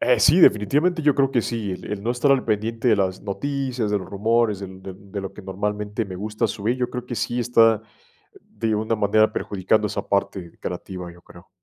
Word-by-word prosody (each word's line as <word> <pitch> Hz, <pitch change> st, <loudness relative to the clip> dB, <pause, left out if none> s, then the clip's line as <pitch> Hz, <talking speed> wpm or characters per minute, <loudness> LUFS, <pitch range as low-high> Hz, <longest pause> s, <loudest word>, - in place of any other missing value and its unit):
Eh, 125 Hz, -, +3 dB
sí, 160 Hz, +7 st, +6 dB
definitivamente 150 Hz, -, +4 dB
yo 150 Hz, -1 st, +4 dB
creo 135 Hz, -1 st, +2 dB
que 125 Hz, -3 st, +2 dB
sí, 110 Hz, -4 st, -3 dB
el 90 Hz, -, -7 dB
el 105 Hz, -1 st, -4 dB
no 115 Hz, -, -1 dB
estar 125 Hz, +3 st, +2 dB
al 135 Hz, -2 st, +1 dB
pendiente 115 Hz, +3 st, -1 dB
de 110 Hz, -, +5 dB
las 95 Hz, -2 st, -1 dB
noticias, 130 Hz, +1 st, -2 dB
de 105 Hz, -, +2 dB
los 95 Hz, -, -9 dB
rumores, 110 Hz, 0 st, +1 dB
del 95 Hz, -1 st, -9 dB
de 95 Hz, -, -7 dB
de 100 Hz, +1 st, -8 dB
lo 95 Hz, -, -6 dB
que 105 Hz, -, -11 dB
normalmente 105 Hz, +3 st, -3 dB
me 95 Hz, -2 st, -7 dB
gusta 105 Hz, +4 st, -1 dB
subir, 110 Hz, +3 st, -2 dB
yo 125 Hz, -1 st, -2 dB
creo 125 Hz, 0 st, -5 dB
que 120 Hz, -, -4 dB
sí 120 Hz, +2 st, -2 dB
está 115 Hz, -3 st, +4 dB, 0.5 s
de 110 Hz, -1 st, -3 dB
una 110 Hz, +2 st, 0 dB
manera 110 Hz, +1 st, +3 dB
perjudicando 105 Hz, +2 st, 0 dB
esa 100 Hz, -, -3 dB
parte 95 Hz, -3 st, -1 dB
creativa, 90 Hz, -1 st, -6 dB
yo 85 Hz, -, -18 dB
creo. 85 Hz, +1 st, -16 dB
105 Hz, 215 wpm, -23 LUFS, 100-120 Hz, 0.5 s, sí